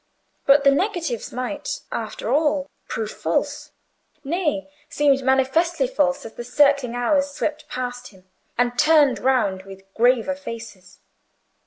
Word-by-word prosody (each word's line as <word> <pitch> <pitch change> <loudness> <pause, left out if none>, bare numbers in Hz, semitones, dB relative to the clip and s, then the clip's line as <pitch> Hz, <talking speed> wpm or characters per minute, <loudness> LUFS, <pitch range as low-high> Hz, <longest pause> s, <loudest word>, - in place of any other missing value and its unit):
But 280 +1 +6
the 275 - +6
negatives 335 - -1
might, 255 +4 -4
after - - -3
all, 295 -1 +1 0.2
prove 220 -1 -3
false; - - -2 0.5
nay, 300 -1 -1 0.2
seemed 285 -1 +2
manifestly 270 - +2
false, 285 - 0
as 225 - -9
the 240 - -7
circling 275 -1 +2
hours 280 +4 +1
swept 300 +1 -4
past 250 0 -5
him, 190 -2 -19 0.3
and 245 +2 0
turned 300 -3 +5
round 240 -8 +1
with 195 0 -12
graver 245 +3 +3
faces. 225 -8 -10
270 Hz, 130 wpm, -22 LUFS, 240-295 Hz, 0.5 s, But